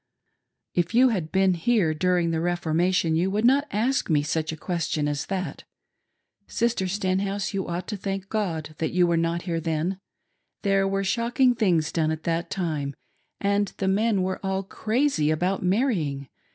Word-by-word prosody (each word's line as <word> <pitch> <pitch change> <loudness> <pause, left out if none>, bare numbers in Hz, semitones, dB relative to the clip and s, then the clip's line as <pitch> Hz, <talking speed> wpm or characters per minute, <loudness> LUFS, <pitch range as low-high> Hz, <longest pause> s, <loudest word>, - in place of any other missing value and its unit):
" - - -56 0.3
If 175 +5 0
you 255 +2 +6
had 180 -9 -2
been 190 -1 +3
here 175 -2 +2
during 175 +1 +1
the 160 - 0
Reformation 175 0 +1
you 175 +4 +1
would 210 +3 0
not 280 +4 +4
ask 240 +4 0
me 150 -3 +3
such 155 +1 -1
a 160 - -6
question 160 -3 -1
as 145 0 -2
that. 190 -2 -4 0.8
Sister 230 -5 0
Stenhouse,'you 195 +1 -1
ought 175 +1 -4
to 210 - -3
thank 195 0 -4
God 170 -8 -2
that 160 - -1
you 180 0 +4
were 170 -1 +2
not 165 +1 0
here 170 -3 -2
then. 165 +3 -2 0.6
There 195 -1 +2
were 195 0 0
shocking 240 +5 +2
things 180 -10 +1
done 160 -2 +1
at 160 0 -3
that 170 0 -1
time, 150 -6 -2 0.4
and 200 0 +1
the 195 - -1
men 200 0 +2
were 185 +1 -3
all 190 0 -1
crazy 220 - 0
about 180 +5 0
marrying. 180 - 0
185 Hz, 170 wpm, -25 LUFS, 165-200 Hz, 0.8 s, you